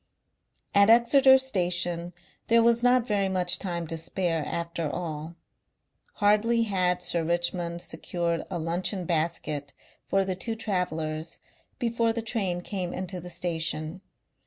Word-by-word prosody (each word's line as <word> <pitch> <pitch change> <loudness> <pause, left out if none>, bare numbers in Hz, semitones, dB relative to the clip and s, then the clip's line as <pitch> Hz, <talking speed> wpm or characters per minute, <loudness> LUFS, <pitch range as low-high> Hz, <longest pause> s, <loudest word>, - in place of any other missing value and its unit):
At 200 +1 +6
Exeter 265 +3 +7
Station 175 -7 -1 0.3
there 230 0 +5
was 235 0 +4
not 245 -1 +4
very 200 -4 +1
much 185 -1 0
time 175 -3 -3
to 165 +1 -1
spare 165 -1 -1
after 170 -2 -3
all. 160 0 -5 0.8
Hardly 215 +3 +3
had 180 -4 +1
Sir 170 -2 0
Richmond 175 0 -1
secured 170 0 -2
a 185 - -3
luncheon 175 +3 -2
basket 155 -4 -1 0.3
for 195 0 +2
the 190 - -1
two 225 +5 -4
travellers 165 -6 -3 0.4
before 230 -1 +1
the 230 0 -3
train 195 -6 -1
came 180 -2 -4
into 185 0 -4
the 180 - -9
station. 165 -1 -3
180 Hz, 135 wpm, -27 LUFS, 170-210 Hz, 0.8 s, Exeter